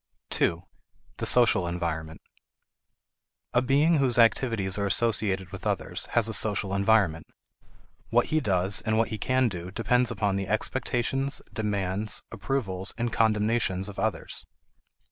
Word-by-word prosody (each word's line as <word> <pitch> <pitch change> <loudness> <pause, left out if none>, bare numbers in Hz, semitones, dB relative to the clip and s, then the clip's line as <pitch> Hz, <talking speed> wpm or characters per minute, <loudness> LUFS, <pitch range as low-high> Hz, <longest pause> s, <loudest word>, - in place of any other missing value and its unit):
2. 85 +1 0 0.5
The - - 0
Social 110 -7 +4
Environment. 80 -2 -4 1.3
A 120 - +3
being 145 +6 +3
whose 130 -3 +1
activities 115 -5 +2
are 100 - 0
associated 100 -4 0
with - - -6
others - - -3
has 115 -2 +4
a 110 - 0
social 100 -2 +3
environment. 100 -5 +2 0.8
What - - +3
he 155 - +4
does 95 -5 +1
and 110 -1 -1
what 115 - +1
he 110 -1 -5
can 130 +3 +1
do 90 -4 -6
depend 120 +4 +1
upon 105 -4 -1
the 95 -1 -3
expectations, 130 +5 -1
demands, 105 -2 -1
approvals, 95 -8 -3
and 120 -1 -2
condemnations 105 -3 +1
of 100 - -9
others. - - -3
105 Hz, 135 wpm, -26 LUFS, 95-120 Hz, 1.3 s, Social